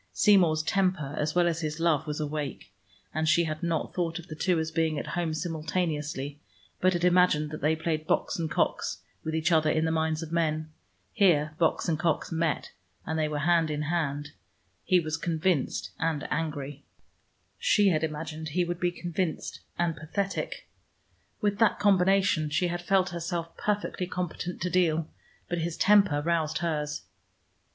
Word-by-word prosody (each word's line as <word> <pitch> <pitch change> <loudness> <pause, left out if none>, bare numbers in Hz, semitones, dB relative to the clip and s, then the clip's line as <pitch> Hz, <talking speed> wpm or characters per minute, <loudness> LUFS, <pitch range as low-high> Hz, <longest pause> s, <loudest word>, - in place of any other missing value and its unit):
Seymour's 165 - +4
temper, 180 -5 0
as 150 +2 -1
well 175 -1 +4
as 170 0 -1
his 155 0 -3
love, 160 -2 +2
was 150 0 -3
awake, 150 -2 -4 0.4
and 155 +1 +1
she 170 - +4
had 155 -1 -3
not 170 -2 -1
thought 170 -2 -1
of 170 - -8
the 155 - -6
two 180 +3 +1
as 160 0 -1
being 160 -1 +1
at - - -3
home 175 -2 0
simultaneously, 155 -3 -2 0.4
but 185 0 +3
had 175 -1 -1
imagined 180 -4 +4
they 155 +1 +1
played 160 -1 -2
Box - - 0
and 160 -1 -1
Cox - - -1 0.2
with 160 0 -2
each 160 +2 +1
other 155 -2 +4
in 155 +1 +2
the 160 - +1
minds 160 0 0
of 160 - -8
men. 155 -2 0 0.4
Here 155 -8 +3
Box 165 +1 +2
and 160 -3 0
Cox 165 -1 0
met, 165 -1 -1 0.3
and 160 0 -2
they 155 - +2
were 150 -1 -3
hand 165 +1 +3
in 150 0 -2
hand. 150 -2 -1 0.5
He 185 - +4
was 155 -1 -2
convinced 165 -2 0
and 160 -3 -1
angry: 150 -3 -3 0.8
she 210 - +4
had 160 -3 +1
imagined 155 0 -4
he 175 +4 +1
would 175 0 -3
be 175 - +2
convinced 175 -1 -3 0.2
and 170 -2 +1
pathetic. 195 +6 -3 0.7
With 205 -1 0
that 225 -2 +4
combination 195 -5 +3
she 175 +4 +1
had 175 0 -3
felt 190 0 +2
herself 170 -1 -4
perfectly 205 -3 -2
competent 180 0 -4
to 180 - 0
deal. 165 -3 +2 0.4
But 175 - -2
his 165 0 -2
temper 200 -8 +4
roused 160 -2 +1
hers. 150 -3 -2
165 Hz, 170 wpm, -28 LUFS, 155-175 Hz, 0.8 s, Seymour's